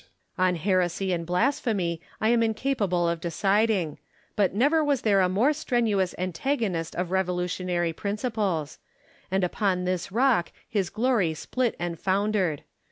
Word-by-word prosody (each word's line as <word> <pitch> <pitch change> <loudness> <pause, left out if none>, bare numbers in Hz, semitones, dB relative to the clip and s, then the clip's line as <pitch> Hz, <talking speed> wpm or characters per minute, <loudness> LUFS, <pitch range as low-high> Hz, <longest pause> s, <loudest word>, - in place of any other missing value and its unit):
On 185 -1 +2
heresy 185 +1 0
and 170 -1 -3
blasphemy 180 - 0 0.2
I 220 - +2
am 235 0 +4
incapable 220 -6 0
of 170 -1 -1
decid 195 +6 +2
ing; 175 -9 -1 0.4
but 200 -3 +2
never 290 - +3
was 285 -4 +1
there 200 -3 +4
a 180 - +3
more 230 +11 +3
strenuous 230 - 0
antagonist 185 - -2
of 180 0 -2
revolutionary 180 -2 -1
principles; 200 - -2 0.5
and 190 0 +1
upon 180 0 0
this 185 0 -2
rock 235 -5 +2 0.2
his 200 -5 -1
glory 220 -8 +1
split 250 +8 -1
and 175 -2 -4
foundered. 190 -5 0
190 Hz, 140 wpm, -26 LUFS, 175-225 Hz, 0.5 s, am